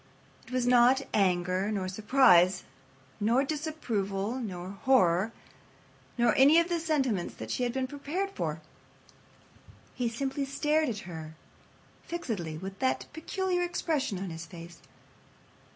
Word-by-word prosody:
It - - -13
was 255 -1 0
not 250 +2 +5
anger, 185 0 +1
nor 195 -3 -2
surprise, 195 -3 +4 0.6
nor 235 +6 +3
disapproval, 245 - -2
nor 185 -5 -5
horror, 205 -6 +3 0.9
nor 235 -2 +3
any 285 +5 +7
of 335 +1 0
the 345 -1 0
sentiments 270 - -1
that - - -7
she - - -2
had 245 -1 +1
been 265 0 -1
prepared 295 +9 -3
for. - - -3 1.3
He 245 -2 -1
simply 270 +4 -2
stared 300 +2 +1
at 215 -3 -3
her 160 -3 -8 0.7
fixedly 210 - -4
with 195 +3 -8
that 130 0 0
peculiar 360 +3 -1
expression 320 - -1
on 185 -1 -5
his 165 0 -7
face. 170 0 -11
240 Hz, 130 wpm, -29 LUFS, 185-285 Hz, 1.3 s, any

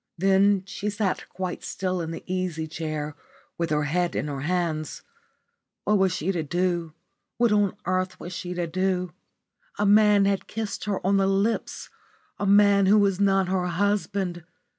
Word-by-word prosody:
Then 195 +1 +3
she 200 +1 -4
sat 205 -2 -2
quite 185 -2 -5
still 185 -1 -2
in 160 - -4
the 165 - -6
easy 180 -3 -2
chair 155 -2 -4 0.4
with 170 - 0
her 150 0 +1
head 175 +4 0
in - - -1
her 140 -2 -4
hands. 160 -2 -2 0.8
What 210 -1 +2
was 190 -1 +3
she 185 0 -1
to 175 -4 -1
do? 175 0 -1 0.4
What 235 -2 +3
on 205 -2 +2
earth 185 0 -1
was 175 - -7
she 180 0 -5
to 175 -1 -1
do? 180 0 -1 0.6
A - - +1
man 205 -1 +5
had 195 -1 0
kissed 220 -1 -4
her 200 -3 -2
on 195 +1 +3
the 195 0 +2
lips 195 +4 -1 0.5
a 200 - -1
man 200 -1 +5
who 205 +2 +6
was 200 -2 +2
not 195 -2 +3
her 185 -1 0
husband. 195 -1 -1
185 Hz, 170 wpm, -25 LUFS, 175-200 Hz, 0.8 s, who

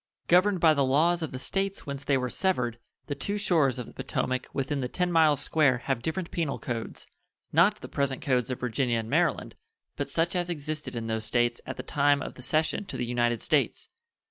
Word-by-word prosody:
Governed 185 +2 +4
by 160 -1 +6
the 140 -2 +2
laws 160 +6 +3
of 160 - -3
the 130 - -5
States 195 +8 -2
whence 140 -1 -5
they 140 -1 +2
were 125 -1 -1
severed, 125 -12 0 0.3
the 145 - -3
two 200 +9 -3
shores 160 -10 +2
of 125 - -4
the - - -13
Potomac 130 0 -2
within 140 0 -2
the 125 - -1
ten 180 +6 -1
miles 155 -4 +4
square 145 -5 +3
have 120 0 -2
different 165 +6 -3
penal 160 -5 -1
codes 115 -3 -5 0.5
not 190 +7 +4
the - - -7
present 140 -2 -1
codes 125 -3 +1
of 130 - -3
Virginia 125 0 0
and 115 0 -4
Maryland, - - +1 0.4
but - - -3
such 170 +2 0
as 175 -1 -1
existed 155 -4 -4
in 115 -1 -3
those 110 -1 -2
States 120 0 +1
at 130 - -5
the 130 - -5
time 145 +1 +2
of - - -6
the - - -12
cession 155 +9 +1
to - - -6
the 120 - -1
United 120 -1 0
States. - - 0
140 Hz, 215 wpm, -28 LUFS, 125-165 Hz, 0.5 s, by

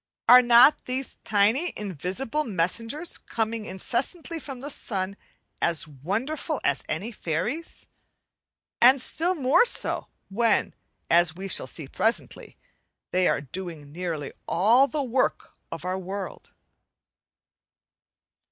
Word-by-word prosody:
Are 250 +2 +10
not 245 +4 +6
these 255 +1 -3
tiny 220 - +2
invisible 205 - -3
messengers 230 - -2
coming 225 -1 -3
incessantly 265 - -3
from 270 -4 -8
the 285 +3 -6
sun 195 -6 -3 0.5
as 165 -3 0
wonderful 200 - -3
as - - +1
any 225 +5 -3
fairies? 195 - -4 1.0
and 260 +3 +7
still 345 +8 -1
more 275 - +4
so 485 - 0 0.2
when, 225 +2 +1 0.4
as 170 -1 +4
we 190 +2 -6
shall - - +1
see 155 -5 -8
presently, 225 - -2 0.5
they 185 0 +3
are - - +1
doing 155 0 -7
nearly 165 -3 -4 0.2
all 230 +10 +4
the 295 0 -2
work 255 0 0 0.2
of - - -6
our 185 +1 -1
world. 190 +1 -6
220 Hz, 115 wpm, -26 LUFS, 180-265 Hz, 1.0 s, Are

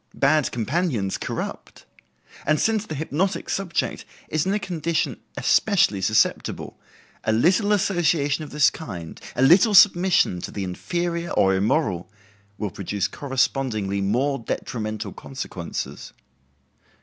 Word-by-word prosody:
Bad 145 +1 +2
companions 120 - -1
corrupt. - - -6 0.6
And 155 0 +2
since 220 -1 +1
the 155 - -5
hypnotic 160 +6 -2
subject 190 -3 -2 0.3
is 155 +3 0
in 195 - +1
a - - +2
condition 170 -5 -2 0.2
especially 175 - +3
susceptible, 110 +3 0 0.4
a - - +1
little 185 - +3
association 170 -7 +1
of 150 - -8
this 150 0 +4
kind, 85 - -8
a 125 - +2
little 190 - +6
submission 180 - +5
to - - -5
the 100 - -4
inferior 170 - -3
or 95 0 +3
immoral, 95 - 0 0.5
will 105 -3 -3
produce 100 +1 -2
correspondingly 130 -7 -1
more 130 +8 0
detrimental 110 -3 -4
consequences. 95 -10 -6
140 Hz, 120 wpm, -23 LUFS, 105-175 Hz, 0.6 s, little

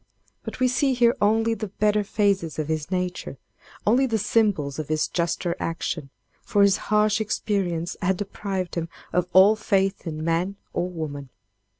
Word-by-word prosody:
But - - -7
we 255 - +4
see 255 +2 +1
here 240 -1 +4
only 225 +2 +3
the 220 -1 -4
better 210 +1 +1
phases 200 -5 0
of 155 -1 -3
his 155 -1 -2
nature, 180 -6 -3 0.5
only 250 +5 +4
the 225 -3 0
symbols 200 -10 +1
of 155 - -4
his 155 0 0
juster 170 0 -1
action, 165 -3 -3 0.3
for 205 -1 +2
his 200 0 +4
harsh 210 0 +3
experience 185 -5 -1
had 185 0 +1
deprived 195 -2 -4
him 165 -1 -3 0.2
of 180 +1 +1
all 195 +3 +7
faith 195 -3 0
in 155 -1 -4
man 170 +4 0 0.2
or 180 - -1
woman. 145 -5 -6
190 Hz, 165 wpm, -24 LUFS, 165-210 Hz, 0.5 s, all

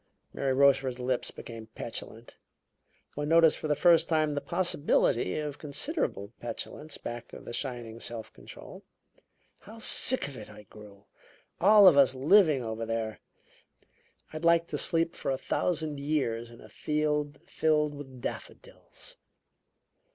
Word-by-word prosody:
Mary 135 -1 -1
Rochefort's 135 -1 +3
lips 125 0 -1
became 115 -2 -10
petulant. 115 0 -7 0.8
One 145 +1 -4
noticed 165 -1 +5
for - - -4
the 150 - +1
first 170 +2 +4
time 155 -2 +1
the 145 - -2
possibility 145 - +1
of 150 -2 -4
considerable 145 - -3
petulance 120 +6 -6
back 120 0 -7
of - - -10
the - - -7
shining 120 -3 -4
self 115 -1 -7
control. - - -12 0.8
"How 220 +3 -13
sick 245 - +3
of 140 -2 -9
it 105 - -10
I 105 - -13
grew 100 -1 -15 0.5
all 205 +1 +7
of 165 -6 +7
us 130 -1 +5
living 150 0 +4
over 110 0 -4
there! 115 -1 -3 1.1
I'd 155 +1 -6
like 170 0 +4
to - - -3
sleep 165 -1 +1
for - - -4
a 135 - 0
thousand 155 -1 -2
years 135 -6 -1
in 120 0 -15
a - - -13
field 150 -1 -2
filled 155 -4 +1
with 135 -3 -10
daffodils." - - -7
140 Hz, 145 wpm, -29 LUFS, 120-155 Hz, 1.1 s, all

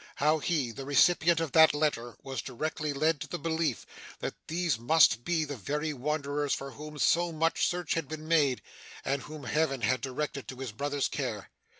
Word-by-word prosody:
How 155 +2 +2
he, 145 -7 0
the 135 +4 -7
recipient 165 +4 +4
of 165 -4 -2
that 160 -2 +7
letter, 130 -6 -1
was 135 -4 -4
directly 150 +5 -3
led 150 +2 +1
to - - -5
the 175 - -4
belief 160 -6 -1 0.3
that - - -4
these 165 -7 0
must 120 -2 +5
be 165 0 0
the 145 -1 -5
very 150 +7 -2
wanderers 145 +1 -1
for 135 0 -6
whom 150 +2 -9
so 170 +5 +3
much 165 +1 +1
search 175 -2 -1
had 165 -4 -2
been 155 +1 -7
made, 145 -6 +2 0.4
and 140 0 0
whom 150 0 -9
Heaven 135 0 0
had 130 +3 +1
directed 140 +1 -4
to 130 - -6
his 130 -2 -5
brother's 140 +4 -1
care. - - -4
150 Hz, 190 wpm, -30 LUFS, 135-160 Hz, 0.4 s, that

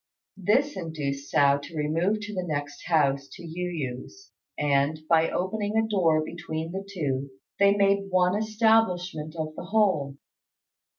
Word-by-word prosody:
This 240 +10 +2
induced 145 -5 -4
Hsiao 140 0 +4
to 160 +3 -9
remove 165 +8 0
to 210 0 -6
the 185 - -2
next 145 -4 -4
house 140 -4 +2
to 175 - -10
Yu 180 +2 -4 0.3
yü's, 375 - -13 0.3
and, 145 +1 +1
by 165 -1 +4
opening 205 +3 -2
a 220 0 +2
door 165 -7 +2
between 160 0 -5
the 190 +2 -4
two, 140 -7 -2 0.3
they 200 0 +5
made 200 0 +2
one 180 0 +3
establishment 210 -7 +1
of 155 -1 -3
the - - -7
whole. 180 -9 +1
170 Hz, 145 wpm, -26 LUFS, 150-200 Hz, 0.3 s, they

